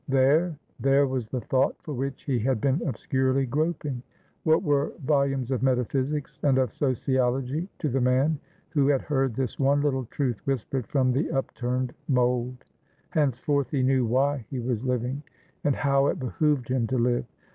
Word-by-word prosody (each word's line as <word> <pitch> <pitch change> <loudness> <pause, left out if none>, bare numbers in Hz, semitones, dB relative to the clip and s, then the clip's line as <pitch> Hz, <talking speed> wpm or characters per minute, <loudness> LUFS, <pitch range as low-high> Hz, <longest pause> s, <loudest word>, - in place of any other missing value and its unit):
There, 145 +5 +3 0.2
there 135 +1 +4
was 130 -4 -2
the 125 +2 -3
thought 130 +4 +1
for 150 - -5
which 135 +1 -4
he 130 -4 0
had 125 +1 +1
been 135 +6 +1
obscurely 130 +1 0
groping! 145 -1 -1 0.4
What 160 0 +3
were 145 -1 +1
volumes 135 -3 +1
of 130 -4 0
metaphysics 135 +3 0
and 135 -3 +3
of 130 -4 +1
sociology 130 - 0
to 155 - -2
the 135 -1 0
man 130 +5 +2 0.3
who 145 -4 +2
had 140 -2 +2
heard 135 -5 0
this 130 -2 -3
one 140 +1 +3
little 135 -3 0
truth 125 -2 -2
whispered 130 -1 -1
from 130 -3 +2
the 135 +6 0
upturned 125 -1 -2
mould? 125 -1 0 0.5
Henceforth 140 -1 +1
he 135 -3 0
knew 130 0 +3
why 135 +2 +1
he 135 - -4
was 120 -1 -2
living, 125 +2 -1 0.4
and 145 -2 +2
how 140 0 +2
it - - 0
behooved 135 -1 0
him 125 -3 +1
to 130 - -1
live. 120 0 +1
135 Hz, 170 wpm, -26 LUFS, 125-140 Hz, 0.5 s, there